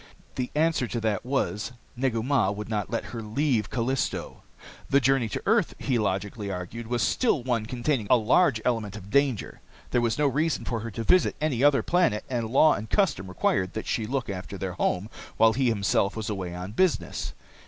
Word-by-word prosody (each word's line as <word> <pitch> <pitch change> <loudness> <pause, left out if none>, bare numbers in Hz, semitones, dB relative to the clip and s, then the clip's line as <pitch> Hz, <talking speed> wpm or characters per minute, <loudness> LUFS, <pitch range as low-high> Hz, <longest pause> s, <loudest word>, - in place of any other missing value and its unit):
The 125 -1 -3
answer 155 -5 +2
to 120 - -3
that 110 -3 0
was 125 -4 -1 0.2
Negu 120 -3 0
Mah 130 -6 +2
would 105 +1 -5
not 105 -3 -2
let 115 - -4
her 115 - -4
leave 115 0 0
Callisto. 130 +2 -2 0.5
The 140 - +5
journey 135 -3 +2
to - - -4
earth, - - +2
he 130 -4 0
logically 100 +1 -2
argued, 95 +5 -5
was 120 -1 0
still 165 - +1
one 115 -4 -1
containing 120 -2 -1
a 125 - +7
large 120 +3 +3
element 110 -5 -1
of 100 -1 -10
danger. 140 -5 +1 0.3
There 120 - +2
was 115 -2 0
no 150 - +2
reason 150 +4 0
for 115 - -2
her 115 +2 -5
to 115 +1 -5
visit 185 +10 +3
any 140 -5 0
other 145 -1 +5
planet, 175 -12 +2
and 120 -3 -1
law 150 +5 +5
and 110 +2 -5
custom 175 - +1
required 95 0 0
that 110 - -4
she 110 -2 -1
look 130 0 -2
after 100 0 -6
their 95 -1 -4
home 90 +2 -1 0.3
while 110 0 +5
he 130 +2 +1
himself 100 -2 +1
was 110 0 -3
away 90 -3 -4
on 90 +2 -6
business. 180 - 0
115 Hz, 195 wpm, -26 LUFS, 105-135 Hz, 0.5 s, a